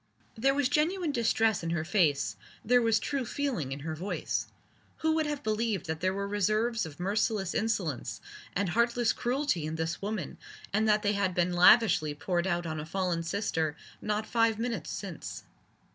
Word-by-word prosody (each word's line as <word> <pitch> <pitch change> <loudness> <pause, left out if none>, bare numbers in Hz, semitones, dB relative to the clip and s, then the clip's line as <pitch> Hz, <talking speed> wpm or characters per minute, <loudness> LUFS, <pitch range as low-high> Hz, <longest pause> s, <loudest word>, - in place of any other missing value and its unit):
There 270 +4 +2
was 285 -2 +2
genuine 320 +4 +1
distress 225 -3 +2
in 165 - -3
her 165 -1 -1
face, 160 -8 +2 0.3
there 245 +2 +5
was 225 -2 +3
true 275 +5 -2
feeling 245 - -2
in 135 +1 -5
her 160 +2 -4
voice. 180 +6 -2 0.6
Who 320 - +4
would 315 -1 +1
have 295 -2 -3
believed 215 -3 -1
that 160 0 -3
there 185 +2 +1
were 200 +1 -3
reserves 215 +1 +1
of 145 0 -12
merciless 200 0 0
insolence 190 - -1 0.4
and 195 -1 0
heartless 235 +3 +2
cruelty 245 - -1
in 155 - -3
this 160 +1 -3
woman 200 -5 -4 0.3
and 215 +1 +2
that 210 0 +3
they 205 0 +2
had 200 -3 0
been 180 0 +1
lavishly 175 -4 +5
poured 175 +3 -1
out 175 -2 0
on 155 -1 -3
a 150 - -5
fallen 180 -1 -1
sister 165 -4 -1 0.2
not 210 +1 -1
five 225 -2 +2
minutes 230 -7 -3
since? 145 - -6
205 Hz, 175 wpm, -30 LUFS, 170-230 Hz, 0.6 s, there